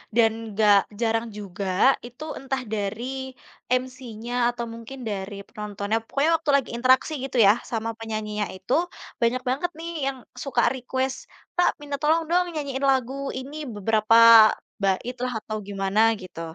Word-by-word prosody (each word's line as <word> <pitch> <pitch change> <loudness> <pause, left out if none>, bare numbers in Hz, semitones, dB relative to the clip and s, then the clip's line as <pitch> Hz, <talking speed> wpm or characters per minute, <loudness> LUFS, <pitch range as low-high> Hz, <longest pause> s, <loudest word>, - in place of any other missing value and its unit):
Dan 225 -1 +2
gak 210 -2 +6 0.2
jarang 225 0 +1
juga, 195 +5 +1
itu 245 +4 -10 0.2
entah 270 0 -3
dari 240 +6 -3 0.4
MC-nya 250 -2 -3 0.2
atau 235 -1 -4
mungkin 230 +4 -9
dari 200 0 -4
penontonnya, 210 +1 -3
pokoknya 280 +7 +1
waktu 320 -2 -5
lagi 275 -3 +1
interaksi 260 +5 +3
gitu 265 - -4
ya, 200 - +8 0.2
sama 225 -1 -2
penyanyinya 215 -2 -3
itu. 190 +6 -3 0.5
Banyak 240 +2 +2
banget 290 +7 -1
nih 335 +1 -5 0.2
yang 265 - -12 0.2
suka 250 -1 0
request, 260 +1 -2 0.4
"Pak, 355 - +5
minta 285 -1 -4
tolong 320 +2 +3
dong 360 +1 +3
nyanyiin 280 -3 -3
lagu 260 -1 0 0.2
ini, 280 +4 -6
beberapa 225 0 +6 0.3
baitlah 245 +6 -1
atau 215 0 -5
gimana 195 +1 0 0.2
gitu." 180 -2 -9
235 Hz, 140 wpm, -25 LUFS, 215-265 Hz, 0.5 s, ya